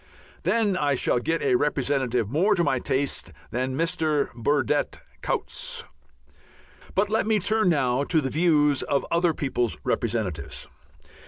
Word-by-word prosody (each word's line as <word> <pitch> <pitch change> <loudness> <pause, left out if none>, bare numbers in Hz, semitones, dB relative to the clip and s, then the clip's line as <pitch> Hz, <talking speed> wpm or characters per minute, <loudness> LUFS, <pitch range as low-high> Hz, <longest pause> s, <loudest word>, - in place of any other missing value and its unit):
Then 215 -4 +1
I 145 -5 +1
shall 125 - +1
get 165 +6 -1
a 135 - +2
representative 130 -4 +1
more 175 - +2
to 175 - +2
my 130 -5 +1
taste 135 -8 -2 0.2
than 130 +2 -2
Mr. 160 -3 0
Burdett 145 +4 0 0.2
Coutts. - - -3 1.1
But 205 +1 +1
let 220 -1 +1
me 220 -1 +3
turn 210 0 +2
now 135 -4 +2
to 160 - +2
the 135 -3 -2
views 150 -3 +3
of 140 -1 0
other 170 -1 +2
people's 125 -4 -1
representatives. 105 -10 -2
145 Hz, 140 wpm, -25 LUFS, 130-175 Hz, 1.1 s, me